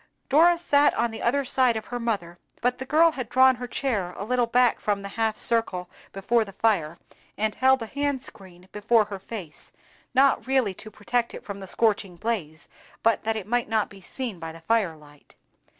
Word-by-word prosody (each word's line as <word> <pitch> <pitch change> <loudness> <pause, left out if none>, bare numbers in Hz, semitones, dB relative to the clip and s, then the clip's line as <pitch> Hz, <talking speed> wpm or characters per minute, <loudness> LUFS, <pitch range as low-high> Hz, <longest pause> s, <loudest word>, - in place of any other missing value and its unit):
Dora 335 +5 +5
sat 290 -4 +3
on 235 - 0
the 225 - -7
other 275 +4 +1
side 250 -2 +2
of 220 - -6
her 245 - -5
mother, 195 -7 -3 0.2
but 250 +1 0
the 260 - -6
girl 325 +3 +5
had 255 -6 -6
drawn 260 0 +5
her 245 0 -6
chair 210 -9 -2
a - - -4
little 245 +2 +1
back 245 +1 +3
from 205 -1 -1
the 200 - -6
half 220 +1 -1
circle 185 -6 0 0.2
before 225 +4 +1
the 195 -2 -11
fire, 180 -7 0 0.4
and 215 0 0
held 260 0 +3
a - - -4
hand 285 +2 -2
screen 185 -3 -13
before 215 +1 +2
her 200 -1 -7
face, 190 -6 -9 0.4
not 270 0 +3
really 260 -7 +2
to 215 - -11
protect 235 +3 -2
it - - -9
from 200 -1 -6
the 190 - -9
scorching 205 -4 0
blaze, 170 -7 -4 0.4
but 230 0 +2
that 225 0 0
it 215 -4 -4
might 240 +1 -1
not 220 -2 0
be 195 -1 -13
seen 230 0 -6
by 165 -1 -6
the 165 0 -13
fire 200 -3 +1
light. 145 -1 -19
225 Hz, 205 wpm, -25 LUFS, 195-250 Hz, 0.4 s, Dora